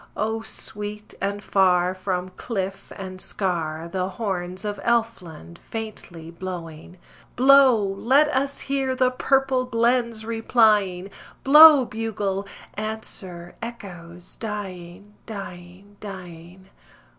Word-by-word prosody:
O 220 +1 -1
sweet 210 -1 -5
and 200 +1 -2
far 180 -2 +3
from 185 -1 -3
cliff 195 -1 -5
and 185 -1 -8
scar 165 -4 -2
The 185 +2 -2
horns 185 -2 -4
of 205 -1 -3
Elfland 220 - -2
faintly 190 -7 -6
blowing! 170 -1 -8 0.4
Blow, 260 -3 +6
let 255 +10 +3
us 275 0 -1
hear 270 -1 -1
the 255 -1 +2
purple 265 0 +1
glens 235 -2 0
replying: 215 -5 +2 0.3
Blow, 300 -1 +9
bugle; 205 -3 -3 0.3
answer, 195 -5 -6
echoes, 175 -7 -9
dying, 200 -2 -7
dying, 195 -1 -10
dying. 185 -1 -10
200 Hz, 100 wpm, -24 LUFS, 180-230 Hz, 0.4 s, Blow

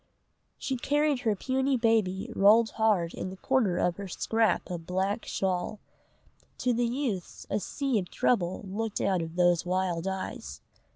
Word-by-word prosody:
She 265 - -2
carried 290 +2 +1
her 220 -4 +1
puny 265 +5 0
baby 225 -2 +1
rolled 220 +3 +5
hard 205 -7 +1
in - - -4
the 190 - -9
corner 225 -6 +1
of 175 - +1
her 200 -1 -6
scrap 225 +5 +1
of 165 -2 -5
black 195 +5 -1
shawl. 190 +2 -2 0.8
To 250 - +1
the 240 +1 +1
youths 235 -8 -3
a - - +1
sea 270 +3 -1
of 180 - -6
trouble 190 -3 0
looked 215 +2 -3
out 190 -3 +1
of 165 0 -6
those 175 -1 +3
wild 180 -1 -1
eyes. 190 - -5
200 Hz, 160 wpm, -28 LUFS, 180-235 Hz, 0.8 s, rolled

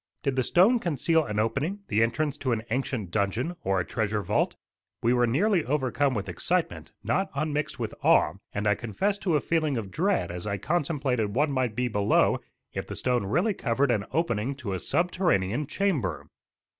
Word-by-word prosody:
Did 140 -2 0
the 130 - +2
stone 190 - +4
conceal 165 - +1
an 105 -4 -2
opening, 140 - -1
the 105 +2 +2
entrance 140 +6 +1
to 130 -3 -1
an 110 -1 -2
ancient 120 -7 -2
dungeon, 110 - -1
or 95 0 +1
a 90 - -1
treasure 110 -2 -1
vault? - - +1 0.5
We 120 +1 +4
were 120 -1 +3
nearly 175 - +2
overcome 135 0 0
with 100 -2 -3
excitement, 90 -2 -2
not 190 +1 0
unmixed 150 +1 -1
with - - -3
awe, - - +4 0.2
and 105 +1 -3
I 105 - +4
confess 190 - -1
to 175 -6 +1
a - - +4
feeling 155 -3 0
of 100 -4 -5
dread 190 - 0
as 90 +3 -5
I 100 -1 -1
contemplated 135 -8 -1
what 145 +2 +2
might 130 -5 0
be 125 +1 0
below 105 -3 +2 0.3
if - - -4
the - - -6
stone 125 -5 0
really 175 - +2
covered 130 -2 +1
an 105 -4 0
opening 135 -5 0
to 120 -8 -5
a 95 - -2
subterranean 150 - +1
chamber. 165 - -1
130 Hz, 185 wpm, -27 LUFS, 105-155 Hz, 0.5 s, stone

